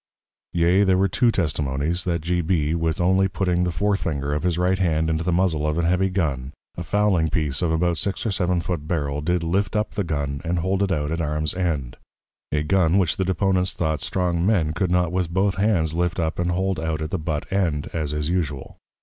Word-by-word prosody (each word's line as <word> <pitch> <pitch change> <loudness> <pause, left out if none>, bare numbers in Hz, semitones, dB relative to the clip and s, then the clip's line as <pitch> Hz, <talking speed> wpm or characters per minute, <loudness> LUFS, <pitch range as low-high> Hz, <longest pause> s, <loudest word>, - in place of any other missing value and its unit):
Yea, 85 +3 +3
there 95 -2 +3
were 95 +1 +3
two 120 +6 +2
Testimonies, 75 -2 -1
that 85 -3 -1
G. 90 +2 0
B. 80 -2 0
with 80 -1 -1
only 95 +2 +3
putting 90 -2 0
the 90 - -1
Fore 100 +4 +1
Finger 70 -6 -2
of 75 - -1
his 90 -2 0
Right 90 +1 +1
hand 80 -3 +1
into 80 +1 -1
the 90 - 0
Muzzle 85 -4 +1
of 75 +1 -1
an 85 - +1
heavy 90 +3 +2
Gun, 70 -8 -2 0.2
a - - -5
Fowling 90 -2 +1
piece 75 -3 -1
of 85 -2 +1
about 85 0 +1
six 100 +3 -2
or 110 - +1
seven 90 -2 0
foot 85 -4 -4
Barrel, 75 -4 -1
did 90 +2 0
lift 95 +5 0
up 105 0 0
the 100 - -2
Gun, 70 -4 -3
and 85 +2 -1
hold 95 +3 0
it 100 -1 +1
out 75 -3 -1
at 85 +1 -1
Arms 75 -1 0
end; 80 -9 -2 0.5
a 75 +1 0
Gun 90 +2 +2
which 90 -5 +1
the 95 - 0
Deponents 95 0 +1
thought 80 -2 -1
strong 90 -2 0
Men 90 -7 +2
could 95 +2 -1
not 90 -1 +2
with 90 -2 -1
both 95 +2 +1
hands 95 -7 +1
lift 85 +1 -1
up, 80 0 -1
and 90 0 0
hold 95 0 0
out 80 0 -2
at 75 - -5
the 95 - -1
But 80 +3 -3
end, 85 -7 0
as 75 -3 -2
is 75 0 -2
usual. 80 -6 -3
85 Hz, 225 wpm, -23 LUFS, 80-95 Hz, 0.5 s, Yea